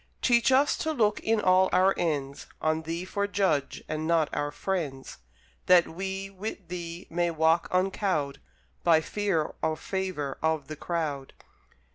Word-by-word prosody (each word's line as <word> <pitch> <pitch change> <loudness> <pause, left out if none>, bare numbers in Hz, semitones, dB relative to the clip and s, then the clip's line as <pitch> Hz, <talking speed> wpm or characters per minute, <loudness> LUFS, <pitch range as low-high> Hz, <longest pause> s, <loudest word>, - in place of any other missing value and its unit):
Teach 240 +1 +4
us 275 +3 +4
to 315 - -1
look 215 -6 +2
in 225 0 +1
all 185 -1 +4
our 185 +1 +4
ends, 145 -5 -2
On 155 0 0
Thee 165 +3 -4
for 200 +2 -1
judge, 190 -9 0
and 155 +1 -3
not 165 -2 +2
our 145 - -1
friends; 145 - -4 0.5
That 180 -2 +6
we, 190 +3 -4
with 195 -1 -7
Thee, 170 -1 -6
may 175 +1 +1
walk 160 +1 +2
uncowed 185 -6 0 0.4
By 160 -2 +5
fear 190 -4 -1
or 155 0 0
favour 185 -9 -3
of 160 -3 0
the 155 - -5
crowd. 150 -4 -3
170 Hz, 150 wpm, -28 LUFS, 155-195 Hz, 0.5 s, That